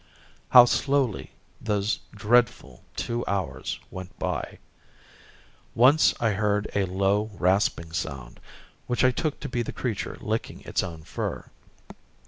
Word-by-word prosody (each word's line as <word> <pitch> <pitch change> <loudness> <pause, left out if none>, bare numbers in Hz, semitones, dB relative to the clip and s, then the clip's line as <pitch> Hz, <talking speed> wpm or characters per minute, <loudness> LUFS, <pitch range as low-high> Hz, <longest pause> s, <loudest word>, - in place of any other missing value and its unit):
How 125 -1 +10
slowly 135 -3 0 0.3
those 105 -1 0
dreadful 110 - +1
two 120 +1 -2
hours 95 -3 -3
went 95 0 -9
by! - - -3 1.2
Once 135 +6 +5
I 115 -2 +2
heard 105 +1 0
a 100 -1 +1
low, 100 +3 +1
rasping 90 -3 +1
sound, 70 -8 -5 0.5
which 125 - 0
I 130 - +5
took 150 +4 -2
to - - -4
be 125 -3 -2
the 120 - -4
creature 115 -6 -4
licking - - -3
its - - -1
own 80 -2 -7
fur. - - -5
105 Hz, 125 wpm, -26 LUFS, 95-120 Hz, 1.2 s, How